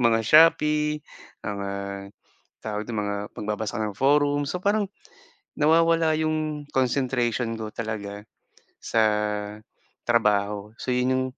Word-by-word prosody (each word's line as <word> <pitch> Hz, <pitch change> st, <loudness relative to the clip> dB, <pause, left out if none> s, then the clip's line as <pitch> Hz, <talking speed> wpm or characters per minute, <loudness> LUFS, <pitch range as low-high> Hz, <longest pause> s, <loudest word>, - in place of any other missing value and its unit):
mga 115 Hz, -1 st, +3 dB
Shopee 150 Hz, +1 st, +5 dB, 0.5 s
ah, 100 Hz, -1 st, -4 dB, 0.6 s
tawag 105 Hz, 0 st, -3 dB
nito, 115 Hz, -, -3 dB
mga 100 Hz, 0 st, -2 dB, 0.2 s
magbabasa 105 Hz, +1 st, -3 dB
ka -, -, 0 dB
ng 100 Hz, -, -13 dB
forum, 145 Hz, +1 st, +3 dB
so 180 Hz, -, -2 dB
parang 205 Hz, 0 st, +1 dB, 0.7 s
nawawala 165 Hz, +1 st, +4 dB
'yong 155 Hz, -2 st, -2 dB
concentration 125 Hz, -3 st, 0 dB
ko 110 Hz, -1 st, -5 dB
talaga 105 Hz, -2 st, -5 dB, 0.6 s
sa 110 Hz, -, +2 dB, 1.0 s
trabaho. 105 Hz, -2 st, +1 dB
So 130 Hz, -, -3 dB
'yon 125 Hz, +1 st, +1 dB
'yong 130 Hz, 0 st, +1 dB
120 Hz, 115 wpm, -25 LUFS, 105-150 Hz, 1.0 s, Shopee